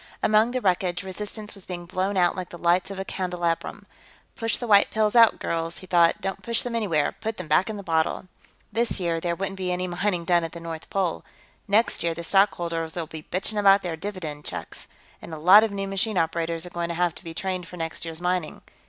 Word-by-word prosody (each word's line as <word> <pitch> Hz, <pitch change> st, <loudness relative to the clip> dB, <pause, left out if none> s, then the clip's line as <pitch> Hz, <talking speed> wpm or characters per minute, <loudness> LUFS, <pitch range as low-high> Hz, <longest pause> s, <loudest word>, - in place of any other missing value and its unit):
Among 215 Hz, +2 st, +4 dB
the 255 Hz, +1 st, -2 dB
wreckage, 180 Hz, -2 st, 0 dB
resistance 210 Hz, +3 st, -6 dB
was 195 Hz, -3 st, -8 dB
being 175 Hz, -1 st, -6 dB
blown 190 Hz, +3 st, -1 dB
out 175 Hz, -1 st, +3 dB
like 180 Hz, -1 st, -5 dB
the 175 Hz, -, -9 dB
lights 175 Hz, +3 st, +2 dB
of 195 Hz, -, -6 dB
a 190 Hz, -, -4 dB
candelabrum. 175 Hz, -3 st, -2 dB, 0.5 s
Push 225 Hz, -1 st, 0 dB
the 245 Hz, -, -4 dB
white 205 Hz, -3 st, +5 dB
pills 215 Hz, +1 st, +1 dB
out, 230 Hz, -2 st, +7 dB
girls, 165 Hz, 0 st, -3 dB
he 185 Hz, -, -10 dB
thought. 175 Hz, +1 st, +3 dB
Don't 195 Hz, 0 st, -3 dB
push 235 Hz, -1 st, 0 dB
them 245 Hz, -, -4 dB
anywhere; 190 Hz, -10 st, +1 dB
put 220 Hz, 0 st, -5 dB
them 180 Hz, -, -6 dB
back 155 Hz, +7 st, +3 dB
in 215 Hz, -, -4 dB
the 200 Hz, -, -7 dB
bottle. 160 Hz, -1 st, 0 dB, 0.5 s
This 230 Hz, 0 st, 0 dB
year, 170 Hz, -2 st, 0 dB
there 170 Hz, 0 st, -1 dB
wouldn't 195 Hz, +1 st, -4 dB
be 180 Hz, -1 st, -1 dB
any 180 Hz, +1 st, -1 dB
mining 180 Hz, 0 st, -1 dB
done 175 Hz, 0 st, +3 dB
at 165 Hz, -, -5 dB
the 170 Hz, -, -7 dB
North 165 Hz, -1 st, -7 dB
Pole; 190 Hz, -4 st, -1 dB, 0.4 s
next 210 Hz, +3 st, +2 dB
year, 165 Hz, -1 st, 0 dB
the 170 Hz, -, -6 dB
stockholders'll 170 Hz, -3 st, +1 dB
be 155 Hz, 0 st, -10 dB
bitching 200 Hz, +3 st, 0 dB
about 195 Hz, -1 st, +5 dB
their 175 Hz, -3 st, -3 dB
dividend 160 Hz, -5 st, -6 dB
checks. -, -, -6 dB, 0.3 s
And 160 Hz, -, -7 dB
a -, -, -7 dB
lot 185 Hz, +7 st, +8 dB
of 225 Hz, -, +1 dB
new 195 Hz, -1 st, -4 dB
machine 195 Hz, +1 st, -1 dB
operators 165 Hz, 0 st, 0 dB
are 180 Hz, -, -9 dB
going 170 Hz, -1 st, -3 dB
to 170 Hz, -, -3 dB
have 175 Hz, -1 st, +1 dB
to -, -, -9 dB
be 165 Hz, -2 st, -8 dB
trained 185 Hz, -1 st, -3 dB
for 180 Hz, -, -10 dB
next 165 Hz, -1 st, -4 dB
year's 165 Hz, -1 st, -3 dB
mining. 180 Hz, -3 st, -2 dB
180 Hz, 230 wpm, -25 LUFS, 170-200 Hz, 0.5 s, lot